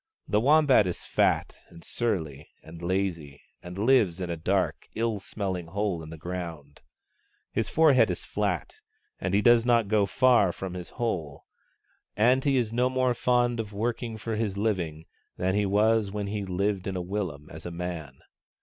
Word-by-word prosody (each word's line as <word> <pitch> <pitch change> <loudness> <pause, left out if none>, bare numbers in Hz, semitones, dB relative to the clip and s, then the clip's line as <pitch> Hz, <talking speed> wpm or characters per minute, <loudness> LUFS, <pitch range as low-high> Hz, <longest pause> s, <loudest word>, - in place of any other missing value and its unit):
The 105 - +2
Wombat 140 -6 +5
is 90 - -4
fat - - +1
and 85 -1 -14
surly 80 - -3
and 85 +1 -11
lazy, 85 -6 -2 0.2
and 90 +1 -9
he 100 - -1
lives 110 -9 +3
in 90 -2 -3
a - - -1
dark, 95 +4 -1
ill 115 -2 -1
smelling 95 -4 -4
hole 100 -1 -2
in 80 - -9
the 80 - -8
ground. 80 -4 -7 0.7
His - - -1
forehead 140 -9 +5
is 90 - -3
fiat, - - -2 0.4
and 95 +1 -1
he 105 - +3
does 120 -1 +6
not 120 -3 +3
go 105 -1 +2
far 120 -4 +4
from 95 +1 -6
his 90 -1 -7
hole; 85 - -4 0.7
and 125 +5 +4
he 140 -2 +2
is 115 -3 0
no 125 +2 +2
more 130 -1 +1
fond 120 0 +1
of 105 -2 -4
working 115 +1 -3
for 110 +1 -4
his 105 -3 -2
living 85 -7 -2 0.3
than 95 +1 0
he 105 0 +1
was 105 +1 +3
when 105 0 -3
he 100 0 -3
lived 95 +1 -1
in 95 - -3
a - - -2
willum 90 -6 -4
as 80 +2 -8
a - - -4
man. 85 -5 -6
100 Hz, 180 wpm, -27 LUFS, 85-115 Hz, 0.7 s, does